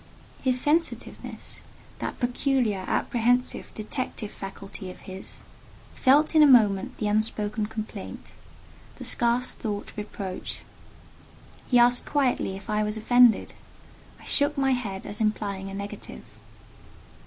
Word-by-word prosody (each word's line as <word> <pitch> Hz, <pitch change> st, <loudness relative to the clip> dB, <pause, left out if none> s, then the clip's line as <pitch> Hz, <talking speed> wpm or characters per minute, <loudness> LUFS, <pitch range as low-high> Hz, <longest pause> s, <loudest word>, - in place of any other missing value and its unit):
His 255 Hz, -1 st, +3 dB
sensitiveness—that 320 Hz, +5 st, -2 dB
peculiar, 245 Hz, -5 st, 0 dB
apprehensive, 245 Hz, +1 st, +1 dB
detective 215 Hz, -1 st, -4 dB
faculty 195 Hz, -1 st, -8 dB
of 180 Hz, -, -11 dB
his—felt 265 Hz, -, -1 dB
in 310 Hz, -, +6 dB
a 300 Hz, -, +8 dB
moment 210 Hz, -7 st, +4 dB
the 210 Hz, -, -1 dB
unspoken 210 Hz, 0 st, 0 dB
complaint—the 215 Hz, 0 st, -10 dB
scarce 240 Hz, +1 st, +1 dB
thought 205 Hz, -2 st, -5 dB
reproach. 200 Hz, -3 st, -6 dB, 1.1 s
He 245 Hz, -, +5 dB
asked 245 Hz, +1 st, +5 dB
quietly 260 Hz, -9 st, +1 dB
if 195 Hz, 0 st, -10 dB
I 210 Hz, 0 st, +1 dB
was 210 Hz, +1 st, -1 dB
offended. 245 Hz, +1 st, +4 dB, 0.7 s
I -, -, -15 dB
shook 285 Hz, +1 st, +1 dB
my 270 Hz, -1 st, +2 dB
head 205 Hz, -7 st, -2 dB
as 210 Hz, -, -5 dB
implying 200 Hz, -3 st, -1 dB
a 195 Hz, -, -7 dB
negative. 200 Hz, +1 st, -7 dB
220 Hz, 110 wpm, -26 LUFS, 205-250 Hz, 1.1 s, a